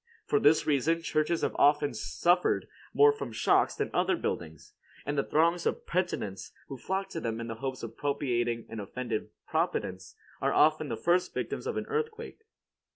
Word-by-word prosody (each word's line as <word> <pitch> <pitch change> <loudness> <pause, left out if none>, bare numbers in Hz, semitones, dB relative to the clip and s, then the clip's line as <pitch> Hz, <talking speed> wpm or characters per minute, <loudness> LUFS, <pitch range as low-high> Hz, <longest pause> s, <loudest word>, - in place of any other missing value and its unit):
For 145 - +2
this 155 +2 +4
reason, 155 +3 +1
churches 155 +1 0
have - - 0
often 145 -1 +4
suffered 170 - +1 0.2
more 435 +1 +6
from 435 - -6
shocks - - +2
than - - -2
other 370 - +2
buildings, 80 - -5 0.3
and 145 - -2
the 140 - +3
throngs 170 +2 +2
of - - -2
penitents 140 - -2 0.2
who 135 - -6
flock 195 +7 -2
to 165 - -4
them 115 -5 -3
in 115 - -4
the 115 - -4
hope 130 -2 -4
of 115 -1 -7
propitiating 120 -5 -1
an 115 - -6
offended 115 +2 -4 0.2
providence 95 0 -2 0.3
are - - +1
often 155 -1 +4
the - - -3
first 175 +1 +1
victims - - -3
of - - -2
an - - -2
earthquake. 455 0 -4
145 Hz, 175 wpm, -29 LUFS, 115-175 Hz, 0.3 s, more